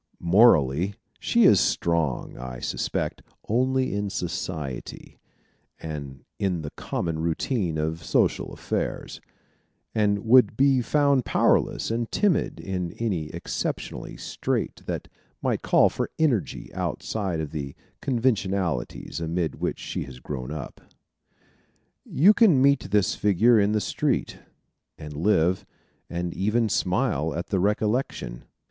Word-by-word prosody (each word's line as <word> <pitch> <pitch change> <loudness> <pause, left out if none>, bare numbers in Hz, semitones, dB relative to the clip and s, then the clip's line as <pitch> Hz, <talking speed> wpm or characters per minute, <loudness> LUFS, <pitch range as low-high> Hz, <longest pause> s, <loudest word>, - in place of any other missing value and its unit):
Morally, 90 - +4 0.2
she 235 -1 +3
is 100 - +7
strong, 80 -6 0
I 65 0 -7
suspect, - - -3 0.3
only 130 +2 +1
in 100 0 -1
society, 80 -7 -5 0.6
and 70 -4 -7 0.2
in 90 -5 -1
the 75 - -5
common 80 -2 -3
routine 85 - -1
of 80 +1 -2
social - - +1
affairs, - - -4 0.7
and 105 -1 +1
would 115 -2 +5
be 135 -1 +4
found 140 +1 +2
powerless - - +2
and 115 0 -2
timid 205 -6 +1
in 90 -3 -3
any 95 -10 -2
exceptional - - -4
strait - - -3
that - - -3 0.3
might - - -1
call - - +5
for - - -3
energy 120 - 0
outside 95 -7 -2
of 75 -2 -4
the 70 -3 -5 0.3
conventionalities 100 - -1
amid 85 0 -2
which - - -1
she - - -5
has 65 -3 -11
grown 65 -2 -5
up. 75 -2 -7 1.2
You 190 +9 +5
can 205 - +5
meet 140 -6 +3
this 100 -1 +2
figure 105 +4 +4
in 100 +1 +2
the 105 - +2
street, - - -1 0.6
and 75 -1 -8
live, 90 +1 +2 0.5
and 85 0 -3
even 110 +3 +1
smile 80 -6 0
at 85 - -4
the 95 - +1
recollection. 105 - -1
95 Hz, 125 wpm, -25 LUFS, 80-115 Hz, 1.2 s, is